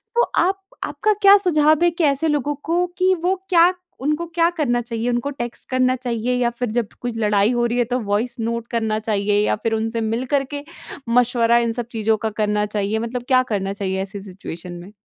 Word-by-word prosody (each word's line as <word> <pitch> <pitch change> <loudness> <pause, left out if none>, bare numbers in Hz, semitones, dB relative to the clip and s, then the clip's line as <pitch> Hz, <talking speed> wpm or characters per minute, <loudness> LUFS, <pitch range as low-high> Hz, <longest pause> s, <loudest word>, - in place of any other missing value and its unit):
तो 475 - +4 0.2
आप 385 +1 -1 0.2
आपका 430 0 0
क्या 400 0 +9
सुझाव 310 -4 +3
है 345 - +5
कि 335 0 -2
ऐसे 285 +2 +2
लोगों 295 -1 0
को 345 +2 +1
कि 375 0 +3
वो 375 +2 +2
क्या 350 +1 +5 0.3
उनको 300 +4 0
क्या 335 0 +4
करना 240 -5 +1
चाहिए, 230 0 -3
उनको 240 +3 -1
टेक्स्ट 240 -4 -7
करना 255 0 +2
चाहिए 245 -1 -2
या 245 -1 +1
फिर 240 -1 -4
जब 230 -4 +1
कुछ 240 -2 -4
लड़ाई 210 0 +2
हो 240 -1 +1
रही 240 +1 -1
है 245 - +3
तो - - +1
वॉइस 215 +3 -1
नोट 230 +1 -2
करना 220 -2 0
चाहिए 205 -1 0
या - - +1
फिर 225 -1 0
उनसे 225 +1 -1
मिल 225 +3 -1
कर 275 - +2
के 285 0 -4 0.5
मशवरा 235 -1 +3
इन 235 -1 +1
सब 240 0 -4
चीज़ों 220 -1 +1
का 220 +1 -2
करना 210 0 +1
चाहिए? 210 +1 -1
मतलब 240 +2 -4
क्या 255 -1 +5
करना 195 0 -1
चाहिए 190 -1 -2
ऐसी 195 +1 -6
सिचुएशन 180 -2 -9
में? 175 +3 -10
240 Hz, 215 wpm, -21 LUFS, 220-285 Hz, 0.5 s, क्या